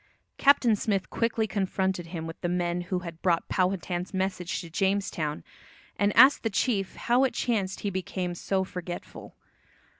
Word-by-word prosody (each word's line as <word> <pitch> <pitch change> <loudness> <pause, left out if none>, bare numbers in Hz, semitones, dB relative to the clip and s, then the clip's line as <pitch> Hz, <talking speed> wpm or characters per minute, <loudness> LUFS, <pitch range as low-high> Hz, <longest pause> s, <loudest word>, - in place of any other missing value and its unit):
Captain 270 -5 +5
Smith 195 -2 -1
quickly 230 -1 0
confronted 190 -3 -1
him 165 -1 -5
with 165 0 -8
the 175 - -1
men 175 0 0
who 180 +1 -2
had 165 -1 -8
brought 170 -3 +1
Powhatan's 185 0 -1
message 190 -2 -2
to 170 - -10
Jamestown, 180 - -1 0.5
and 205 0 +2
asked 260 +4 +8
the 225 - 0
chief 200 -2 0
"how 245 +2 +2
it 265 - +1
chanced 200 -6 -1
he 205 - -2
became 185 -1 -3
so 190 +2 -1
forgetful." 180 -1 -8
190 Hz, 155 wpm, -27 LUFS, 175-205 Hz, 0.5 s, asked